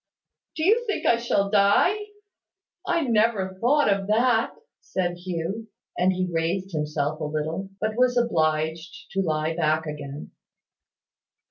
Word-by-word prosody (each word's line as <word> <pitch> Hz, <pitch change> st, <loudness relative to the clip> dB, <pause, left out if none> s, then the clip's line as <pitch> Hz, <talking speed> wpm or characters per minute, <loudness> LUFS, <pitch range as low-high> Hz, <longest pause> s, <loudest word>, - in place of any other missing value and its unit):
"Do 315 Hz, -, -1 dB
you 450 Hz, +5 st, +4 dB
think 420 Hz, -, -2 dB
I 235 Hz, -, +4 dB
shall 200 Hz, -4 st, 0 dB
die? 205 Hz, -, +4 dB, 0.9 s
I 340 Hz, -1 st, +2 dB
never 220 Hz, -7 st, +1 dB
thought 285 Hz, +5 st, +3 dB
of 195 Hz, -1 st, +1 dB
that," 225 Hz, +1 st, +2 dB, 0.3 s
said 180 Hz, -2 st, -2 dB
Hugh. 180 Hz, +5 st, -4 dB, 0.3 s
And 180 Hz, +1 st, +3 dB
he 185 Hz, 0 st, -1 dB
raised 175 Hz, +4 st, -1 dB
himself 150 Hz, -1 st, -2 dB
a -, -, -4 dB
little, 155 Hz, +5 st, -3 dB
but 215 Hz, 0 st, -1 dB
was 250 Hz, 0 st, +3 dB
obliged 160 Hz, -6 st, -1 dB
to 195 Hz, -, 0 dB
lie 155 Hz, -2 st, -1 dB
back 160 Hz, -1 st, +1 dB
again. 145 Hz, -1 st, -7 dB
190 Hz, 135 wpm, -25 LUFS, 160-225 Hz, 0.9 s, you